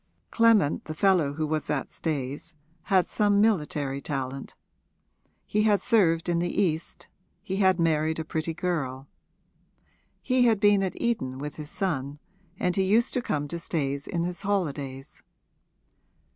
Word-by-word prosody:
Clement, 225 -9 +3
the 155 - -6
fellow 175 -5 +3
who 155 +1 -2
was 155 0 -2
at 145 -3 -2
Stayes, 150 +1 -4 0.3
had 190 -2 +3
some 205 -1 +2
military 150 -10 +1
talent; 135 -1 -5 0.9
he 210 - 0
had 210 -2 +3
served 180 -8 +2
in 170 -1 +1
the 175 +3 -1
East, 165 -4 -1 0.4
he 195 -2 -3
had 190 -2 +3
married 160 -1 +1
a 160 - -4
pretty 160 +1 -3
girl. 140 -7 -3 1.2
He 255 -1 +3
had 225 -3 +3
been 205 -1 +4
at 185 -2 -3
Eton 130 - -1
with 145 +1 -6
his 150 -1 -7
son, 145 -7 -2 0.4
and 180 -1 0
he 195 - +2
used 220 +6 +2
to 250 - +1
come 145 -10 -2
to 170 - -4
Stayes 140 -4 -2
in 170 -1 -1
his 175 0 -4
holidays. 145 -9 -3
165 Hz, 150 wpm, -27 LUFS, 145-195 Hz, 1.2 s, been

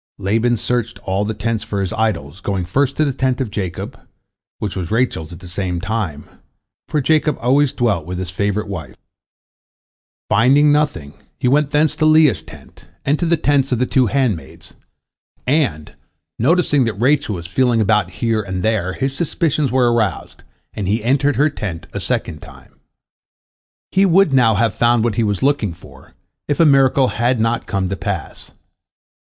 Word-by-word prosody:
'" - - -72
Laban 120 +2 +2
searched 120 0 -2
all 95 +2 -1
the 110 +1 -3
tents 110 -1 -2
for 100 - -4
his 95 +2 -2
idols, 110 -8 -2
going 95 -1 -2
first 135 +9 0
to 155 - +3
the 140 - -1
tent 130 0 -1
of 125 -6 -3
Jacob, 95 -5 -5 0.6
which 105 - -4
was 90 -3 -4
Rachel's 110 -9 -1
at 85 +1 -11
the 90 - -10
same 90 -1 -3
time, 95 -7 -3 0.6
for 150 - 0
Jacob 155 +2 +1
always 135 +3 +2
dwelt 105 -10 -1
with 90 0 -4
his 90 -1 -4
favorite 100 +3 -1
wife. 85 -6 -7 1.3
Finding 140 +7 +4
nothing, 145 - 0 0.2
he - - -1
went 145 +2 +3
thence 150 +1 +2
to 155 - +3
Leah's 155 - +4
tent, 80 - -15 0.2
and 145 +2 +1
to 175 - 0
the 170 0 +2
tents 140 -2 +1
of 125 - +2
the 125 - +1
two 130 -1 +2
handmaids, 110 - -2 0.7
and, 130 - 0 0.5
noticing 145 0 +2
that 115 - -2
Rachel 130 -3 +2
was 85 -1 -7
feeling 120 +6 +1
about 105 -3 +2
here 110 +3 -1
and 95 -2 -4
there, 105 -5 0
his 135 +3 -2
suspicions 155 -2 0
were 125 -2 +3
aroused, 110 -7 -2 0.3
and 100 - -4
he 105 +3 0
entered 140 +3 +2
her 145 +5 +2
tent 95 - -6
a - - -3
second - - -3
time. - - -15 1.2
He 195 +1 +3
would 185 -3 +4
now 120 -5 +4
have 110 +1 +1
found 120 -1 +2
what 120 -2 +1
he 115 - 0
was 100 -3 -1
looking 130 - +1
for, - - -17 0.3
if 145 - -1
a 165 - +6
miracle 135 -2 +4
had 120 +1 0
not 115 +1 0
come 95 -3 -1
to 95 - -2
pass. 85 - -5
115 Hz, 180 wpm, -18 LUFS, 100-140 Hz, 1.3 s, a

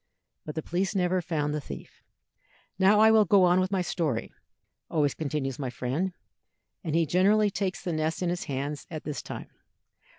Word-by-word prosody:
But 150 - -5
the 160 - -3
police 190 +4 -1
never 180 -1 +2
found 150 -4 -1
the 150 - -2
thief. - - -10 0.8
"Now 200 +2 +5
I 220 +1 +7
will 220 -1 +6
go 200 -2 +5
on, 180 0 +5
with 185 0 +1
my 190 -2 +1
story," 155 -10 -2 0.6
always 145 -3 +1
continues 145 -2 -3
my 135 -3 -2
friend, 135 +10 -2 0.7
and 160 -3 -2
he 165 0 +3
generally 200 +5 +3
takes 190 0 -2
the 175 - -2
nest 155 +3 -1
in 175 - +1
his 175 - -3
hands 140 +1 -4
at 155 -2 -6
this 150 -2 -4
time. - - -8
170 Hz, 185 wpm, -28 LUFS, 150-190 Hz, 0.8 s, I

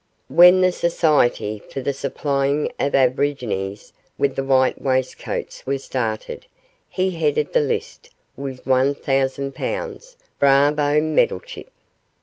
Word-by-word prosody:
When 180 +6 +7
the 185 0 +4
Society 150 -12 +1
for - - -5
the 135 +2 -2
Supplying 140 +1 -1
of 140 - 0
Aborigines 125 -7 -1 0.2
with 140 -1 0
White 135 -1 +2
Waistcoats 130 -1 -3
was 135 0 -2
started 115 - -4 0.4
he 185 0 -1
headed 150 -3 -1
the - - +4
list 145 - -4 0.3
with 135 -2 -7
one 130 +2 +2
thousand 135 0 -1
pounds - - -5 0.2
bravo, 145 +2 +3
Meddlechip! 155 -11 -1
140 Hz, 115 wpm, -21 LUFS, 130-150 Hz, 0.4 s, When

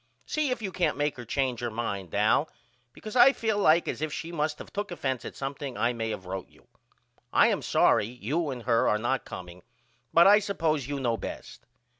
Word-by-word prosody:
See 305 -2 -1
if 250 -3 -2
you 195 - -3
can't 175 -4 0
make 145 0 0
her 120 - -8
change 130 0 -1
her 120 - -2
mind 100 -6 -4
Al 110 +9 +3 0.4
because 215 - -9
I 260 +2 +7
feel 220 -4 -1
like 170 -3 +4
as - - -3
if 155 -1 -2
she 165 +3 -5
must 150 -2 -2
of - - -11
took 205 +1 -3
offense 135 -8 -3
at - - -7
something 135 -1 -5
I 120 +1 +1
may 115 -1 -3
of 95 - -6
wrote 95 0 -6
you. - - -25 0.6
I - - +5
am - - 0
sorry 105 - +3
you 130 +8 -2
and 125 -3 -5
her 115 -1 +2
are 105 - +2
not 120 +3 -1
comeing 90 0 -9 0.5
but 170 - +6
I 205 +2 +8
suppose 160 - -1
you 145 -1 -3
know 120 -3 0
best. - - -8
140 Hz, 215 wpm, -28 LUFS, 115-170 Hz, 0.6 s, I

